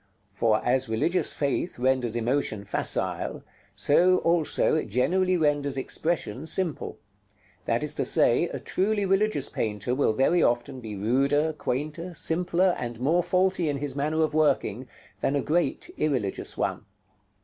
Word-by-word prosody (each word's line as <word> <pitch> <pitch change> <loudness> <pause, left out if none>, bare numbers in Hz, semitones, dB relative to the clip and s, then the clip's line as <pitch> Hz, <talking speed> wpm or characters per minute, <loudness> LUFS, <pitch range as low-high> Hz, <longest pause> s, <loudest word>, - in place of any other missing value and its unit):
For 110 -2 +1
as 130 0 +1
religious 165 +12 +1
faith 145 +5 -2
renders 125 -2 0
emotion 120 -3 -1
facile, 100 - -1 0.3
so 180 +5 +4
also 170 -3 +1
it 155 - 0
generally 180 - +1
renders 145 -3 0
expression 150 -1 -1
simple; 175 -3 +1 0.7
that - - 0
is - - 0
to - - -1
say - - +4
a - - -5
truly 205 +2 -1
religious 195 -6 +1
painter 110 +2 -2
will 130 -4 +1
very 135 +9 +2
often 120 +3 0
be 110 -3 -7
ruder, 140 +9 +1
quainter, 155 +5 -4
simpler, 180 +3 +1
and 120 -2 -5
more 160 +8 +2
faulty 180 -1 +1
in 145 - -1
his 140 -1 -4
manner 155 +3 0
of 155 -1 -1
working, 135 -6 +1 0.3
than 135 - 0
a - - +2
great 175 - -1
irreligious 125 -10 -2
one. - - -2
145 Hz, 145 wpm, -26 LUFS, 125-175 Hz, 0.7 s, so